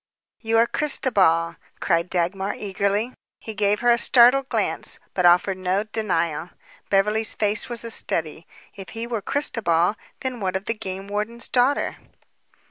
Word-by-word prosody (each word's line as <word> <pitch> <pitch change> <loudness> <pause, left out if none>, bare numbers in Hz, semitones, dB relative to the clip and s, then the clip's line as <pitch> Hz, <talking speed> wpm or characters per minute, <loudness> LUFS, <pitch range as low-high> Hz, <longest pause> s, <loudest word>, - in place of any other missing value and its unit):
"You 225 0 0
are 230 - +5
Christobal," 185 - +2 0.2
cried 170 -1 0
Dagmar 190 +3 -1
eagerly. 200 +4 -2 0.3
He 220 - -8
gave 205 +1 +1
her 240 0 +4
a 235 - +3
startled 255 +3 +5
glance, - - +1 0.2
but 180 -2 +3
offered 185 +2 +3
no 185 +2 0
denial. 180 -7 -2 0.4
Beverly's 210 +3 +1
face 210 +2 0
was 235 -1 -4
a 230 - -4
study. 160 -5 -2 0.3
If 195 -1 -10
he 230 - -3
were 235 -3 -3
Christobal, 195 - 0 0.3
then 260 -2 -4
what 190 -2 -2
of 190 +1 -3
the 230 - -1
game 195 -2 -7
warden's 210 +3 -4
daughter? 255 +3 +1
205 Hz, 150 wpm, -23 LUFS, 185-230 Hz, 0.4 s, are